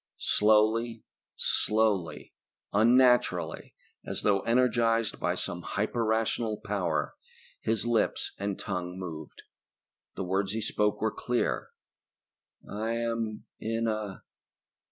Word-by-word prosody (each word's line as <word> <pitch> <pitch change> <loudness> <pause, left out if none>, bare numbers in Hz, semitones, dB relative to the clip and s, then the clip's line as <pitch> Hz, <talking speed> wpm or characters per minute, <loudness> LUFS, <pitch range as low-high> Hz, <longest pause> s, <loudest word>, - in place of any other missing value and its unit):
Slowly, 110 +2 +3 0.3
slowly, 105 -5 0 0.4
unnaturally 125 +4 +3 0.3
as - - -4
though 100 -2 +3
energized 115 -1 +2
by - - 0
some 90 - -4
hyper 110 +6 -1
rational 110 0 0
power 95 -7 -1 0.5
his 110 +1 -1
lips 120 -1 +1
and 100 -1 -2
tongue 90 -3 -4
moved. 80 -5 -7 0.7
The - - -3
words 95 +2 0
he 110 - -2
spoke 105 -1 0
were 110 0 +1
clear. 125 -1 -1 1.0
"I 110 +3 -2
am 115 -2 -2
in 115 +1 -1
a 110 -3 -3
110 Hz, 105 wpm, -29 LUFS, 100-115 Hz, 1.0 s, Slowly